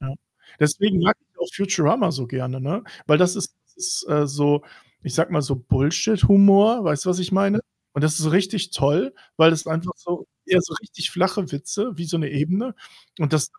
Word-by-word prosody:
Ja. 135 0 -6 0.5
Deswegen 185 +6 +2
mag 215 +4 +4
ich 295 - -38
auch 175 - -4
Futurama 185 -6 +1
so 135 -4 -5
gerne, 130 +1 -5
ne? 165 - -3 0.2
Weil 150 -1 +5
das 180 0 +3
ist - - -5 0.2
ist, 365 - -3
äh, 150 -2 +2
so 145 +1 +1 0.4
ich 145 - -6
sage 165 +3 +1
mal 150 -3 +1
so, 135 0 -2
Bullshit-Humor, 200 - +4
weißt 150 -2 0
du, 185 - +1
was 180 - 0
ich 180 0 -3
meine? 200 +3 +2 0.3
Und 145 - -2
das 155 0 +3
ist - - -1
so 155 - +1
richtig 190 +1 0
toll, 155 - +1 0.2
weil 160 0 +7
das 165 -1 -2
einfach 165 +3 -3
so 175 0 -6 0.2
ja 185 - +4
so 175 - -6
richtig 190 -5 -5
flache 190 0 -1
Witze 205 - -4
wie 170 - -5
so 170 - -2
'ne 150 -4 -2
Ebene. 180 - -2 0.4
Und 150 -2 -1
das 150 - 0
170 Hz, 205 wpm, -22 LUFS, 145-195 Hz, 0.5 s, weil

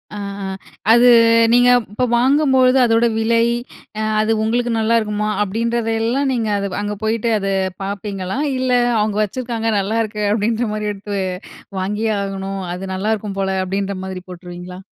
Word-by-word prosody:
அ, - - -6 0.3
அ. - - -3 0.5
அது 240 +2 +6 0.5
நீங்க 245 0 +5 0.2
இப்ப 250 +4 0
வாங்கும்போது 265 0 +4
அதோட 230 0 +3
விலை, 230 +1 +2 0.6
அ - - -1 0.2
அது 215 +1 0
உங்களுக்கு 240 +2 0
நல்லாயிருக்குமா! 215 -2 +1
அப்பிடின்றதெல்லாம் 230 +4 0
நீங்க 230 -3 -1
அத 200 -1 -3
அங்க 205 0 -3
போயிட்டு 225 +1 0
அத 195 - -3 0.4
பார்ப்பீங்களா? 195 +1 -4 0.2
இல்ல 255 0 0 0.3
அவுங்க 210 -1 0
வச்சுருக்காங்க, 230 +1 -3
நல்லாயிருக்கு 215 +1 -1
அப்பிடின்ற 225 +2 0
மாரி 210 0 -2
எடுத்து 205 0 -5 0.6
வாங்கியே 210 +4 -1
ஆகணும், 195 0 -4
அது 180 +2 -6
நல்லாயிருக்கும் 210 0 -2
போல 190 -1 0
அப்பிடின்ற 195 +1 -2
மாதிரி 190 -1 -6
போட்டுருவீங்களா? 180 0 -9
215 Hz, 135 wpm, -19 LUFS, 195-230 Hz, 0.6 s, அது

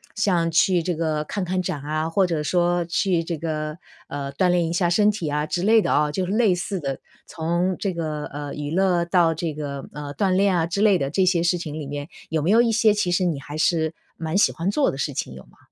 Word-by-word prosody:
像 180 -6 +1
去 175 +2 +3
这 175 +1 -2
个 155 -2 -1
看 195 +5 -3
看 185 +1 -1
展 175 -6 -4
啊， 155 +2 -2
或 190 +3 +2
者 165 -4 -1
说 175 +2 +1
去 175 0 +1
这 165 -1 -4
个， 155 -1 -3 0.3
呃， 140 -1 -5
锻 180 +6 +2
炼 175 -1 +2
一 - - -3
下 175 0 +1
身 210 +4 +4
体 180 -6 -4
啊， 150 +1 -1
之 175 +3 -2
类 220 +2 +5
的 - - -1
啊 150 0 +3
就 185 +4 -1
是 180 - -4
类 215 -3 +3
似 190 +2 -3
的， 135 -4 -4 0.3
从 170 +3 -1
这 200 - -1
个， 155 -3 -3
呃， 145 0 -6
娱 145 0 -4
乐 180 0 +2
到 170 -1 +3
这 160 0 -3
个， 140 -2 -5
呃， 145 -1 -6
锻 190 +4 +1
炼 190 0 +3
啊， 165 -2 +2
之 175 +4 -2
类 205 -3 +5
的， 135 -3 -2
这 185 +6 +2
些 175 -2 +2
事 175 +1 +2
情 160 -3 -6
里 155 - -5
里 145 - -6
面， 145 0 -5 0.2
有 160 -1 0
没 165 - 0
有 230 +2 +6
一 235 - +2
些 220 -1 +4
其 205 -4 0
实 180 +1 +2
你 165 -5 -1
还 145 +3 -7
是 160 0 +1 0.2
蛮 160 +3 -2
喜 - - +4
欢 170 +3 -2
做 285 +4 +2
的 135 - -4
事 145 - -2
情 65 - -4
有 65 0 -11
吗？ - - -24
170 Hz, 280 characters per minute, -23 LUFS, 150-185 Hz, 0.3 s, 有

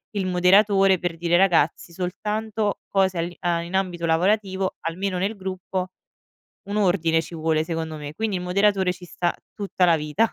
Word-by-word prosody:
il 195 -2 -1
moderatore, 195 +1 +4
per 175 -2 -3
dire: 175 +1 +2
“Ragazzi, 175 -3 +2
soltanto 210 +4 -2
cose 190 -2 +1
all'i 170 +1 -3
a 170 -1 0
in 170 +2 -8
ambito 180 -3 -1
lavorativo”, 190 +3 +1
almeno 185 +3 -2
nel 200 +4 -1
gruppo, 185 -1 -4 0.8
un 205 - -3
ordine 170 -5 +2
ci 170 - -10
vuole, 160 -1 +1
secondo 160 -1 -4
me, 145 0 -7
quindi 215 +1 -1
il 180 - -4
moderatore 190 0 +2
ci 180 0 -13
sta 175 0 -1 0.2
tutta 195 -3 0
la 165 -1 +5
vita. 155 +9 0
180 Hz, 170 wpm, -23 LUFS, 170-195 Hz, 0.8 s, la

